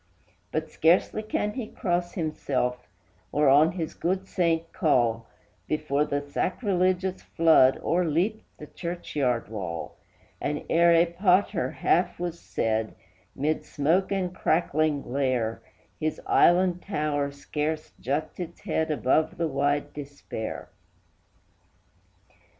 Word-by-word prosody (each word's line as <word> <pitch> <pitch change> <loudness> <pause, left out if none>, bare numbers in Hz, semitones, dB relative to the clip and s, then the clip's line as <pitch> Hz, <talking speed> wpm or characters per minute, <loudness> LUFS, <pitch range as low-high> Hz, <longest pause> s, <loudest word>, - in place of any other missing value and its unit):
But 155 0 -3
scarcely 170 +6 +3
can 210 -1 -2
he 230 -2 -4
cross 175 -3 -2
himself, 135 -7 -2 0.4
or 150 0 +2
on 145 +5 +6
his 165 -4 -4
good 185 +2 -1
saint 165 -3 0
call, 115 -6 +1 0.4
Before 150 -1 0
the 145 0 -3
sacrilegious 185 - 0
flood 160 -5 +4
o'erleaped 175 +5 +1 0.2
the 150 - -9
churchyard 145 -8 -2
wall; 90 -6 -5 0.4
And, 150 0 -2
ere 170 +1 +5
a 170 0 +6
pater 180 +1 +2
half 175 +1 +1
was 175 -1 -4
said, 110 0 -2 0.4
mid 150 +3 -1
smoke 165 +7 +1
and 185 -2 -1
crackling 155 -4 +1
glare, 125 -4 -1 0.4
His 155 0 -2
island 180 0 +4
tower 150 -6 -1
scarce 150 +2 -4
juts 140 +8 -3
its 170 -1 -6
head 160 0 -1
above 150 +1 +1
the 170 - 0
wide 145 0 0
despair. 140 -6 -6
155 Hz, 115 wpm, -26 LUFS, 140-175 Hz, 0.4 s, on